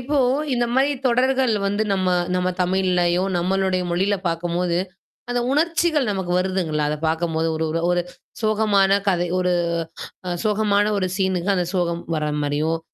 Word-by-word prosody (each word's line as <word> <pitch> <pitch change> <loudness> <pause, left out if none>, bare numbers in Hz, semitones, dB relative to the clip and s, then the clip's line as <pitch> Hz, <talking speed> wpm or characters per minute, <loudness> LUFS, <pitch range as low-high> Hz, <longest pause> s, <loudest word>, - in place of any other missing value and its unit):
இப்போ 285 +4 -2 0.4
இந்த 240 0 +1
மாதிரி 275 +2 +3 0.2
தொடர்கள் 255 0 +2
வந்து 205 +2 0
நம்ம 185 -1 +1 0.3
நம்ம 180 0 0
தமிழ்லயோ 180 -1 +1 0.2
நம்மளுடைய 185 +1 0
மொழியில 195 +4 +1
பார்க்கும்போது, 170 +1 -1 0.5
அந்த 245 0 0
உணர்ச்சிகள் 315 -4 +1
நமக்கு 190 -3 -3
வருதுங்களா? 180 -5 -1
அதைப் 150 +1 -3
பார்க்கும்போது, 165 0 -1
ஒரு 160 0 -1 0.3
ஒரு 175 0 +1 0.4
சோகமான 210 -3 +2 0.2
கதை, 175 -1 +1
ஒரு 180 0 +1 0.9
சோகமான, 205 -1 +2
ஒரு 185 -1 -1
சீன் 190 -2 +1 0.2
அந்தச் 180 -1 -1
சோகம் 170 -1 0
வர்ற 150 -1 -1
மாரியும், 155 +3 0
185 Hz, 135 wpm, -22 LUFS, 175-210 Hz, 0.9 s, மாதிரி